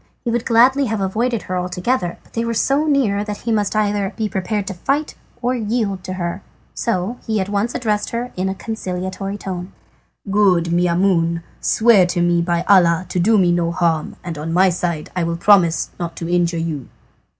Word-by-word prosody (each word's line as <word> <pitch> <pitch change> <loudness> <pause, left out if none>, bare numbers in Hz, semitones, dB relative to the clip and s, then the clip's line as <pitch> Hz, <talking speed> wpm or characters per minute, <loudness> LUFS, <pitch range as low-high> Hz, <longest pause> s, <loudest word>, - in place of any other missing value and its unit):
He 235 - 0
would 235 0 -1
gladly 255 +4 +4
have 220 -3 -2
avoided 220 +5 -1
her 185 - -4
altogether, 180 +2 -1
but - - -25
they 230 - -1
were 230 0 -2
so 280 +7 +1
near 235 -9 +2
that 210 -1 -6
he 230 - -2
must 210 -2 0
either 205 -2 0
be 220 -2 0
prepared 205 +1 -2
to 195 - -4
fight 275 - -1 0.3
or 245 +1 +1
yield 215 -5 -1
to 185 - -4
her, 175 +1 -3 0.3
so 230 +1 -2
he 220 -1 0
at 190 0 -2
once 205 +4 -1
addressed 210 -4 -1
her 240 +1 -4
in 185 +1 -1
a 190 - -3
conciliatory 195 -2 -4
tone: 185 -2 -6 0.6
"Good 185 -5 +3
Maimoune, 170 -1 +2 0.2
swear 220 -5 +4
to 175 0 -1
me 175 0 +2
by 170 0 0
Allah 180 -3 +4
to 180 - -1
do 215 +5 +4
me 180 -3 +4
no 170 -1 +1
harm, 170 -3 0
and 165 -4 -5
on 160 +2 -4
my 185 +3 +4
side 170 -3 -3
I 180 - 0
will 170 0 -1
promise 175 -3 +3
not 170 -1 -4
to 165 - -5
injure 175 -1 +1
you." 160 -5 -4
190 Hz, 195 wpm, -19 LUFS, 175-220 Hz, 0.6 s, gladly